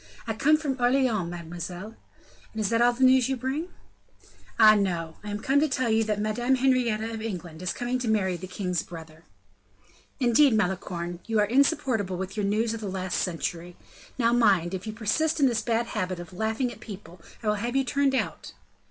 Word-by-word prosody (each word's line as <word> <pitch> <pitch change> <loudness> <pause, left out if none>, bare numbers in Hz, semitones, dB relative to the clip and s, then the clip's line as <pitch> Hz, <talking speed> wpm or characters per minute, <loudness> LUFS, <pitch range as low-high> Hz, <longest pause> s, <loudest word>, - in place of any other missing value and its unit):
"I 225 - -2
come 300 +8 +3
from 285 -4 -3
Orleans, 245 -7 +2
mademoiselle." 175 +4 -7 0.6
"And 220 - -5
is 205 - 0
that 230 0 +2
all 240 0 +5
the 255 +2 -1
news 260 -1 +5
you 265 - 0
bring?" 265 +7 -3 0.9
"Ah, 215 -1 +9
no; 175 -6 -1
I 210 - -6
am 205 0 -3
come 275 +2 +3
to 310 - +3
tell 255 -3 0
you 220 +1 +3
that 210 -1 -1
Madame 240 +5 +1
Henrietta 240 -4 +1
of 220 - -5
England 175 -7 -6
is 185 - -1
coming 245 +1 -2
to 250 - -3
marry 195 -4 +1
the 180 +2 -7
king's 180 -1 -2
brother." 160 -2 -11 0.9
"Indeed, 255 +1 +5
Malicorne, 175 -3 -2
you 225 -1 0
are 210 - +4
insupportable 235 - +1
with 190 +2 -5
your 205 -2 -1
news 220 +3 +1
of 225 - -5
the 210 - -4
last 185 -1 -2
century. 175 0 -3 0.4
Now, 235 -2 +2
mind, 195 -7 +3
if 190 +3 -5
you - - -2
persist 300 +10 0
in 280 - +5
this 235 -4 +2
bad 235 0 0
habit 185 -5 -3
of 175 +1 -9
laughing 220 +6 -1
at - - -12
people, 185 -5 -10 0.2
I - - -4
will 210 - +2
have 240 +2 -3
you 270 - +3
turned 275 +1 +1
out." 190 - -3
220 Hz, 205 wpm, -26 LUFS, 185-245 Hz, 0.9 s, Ah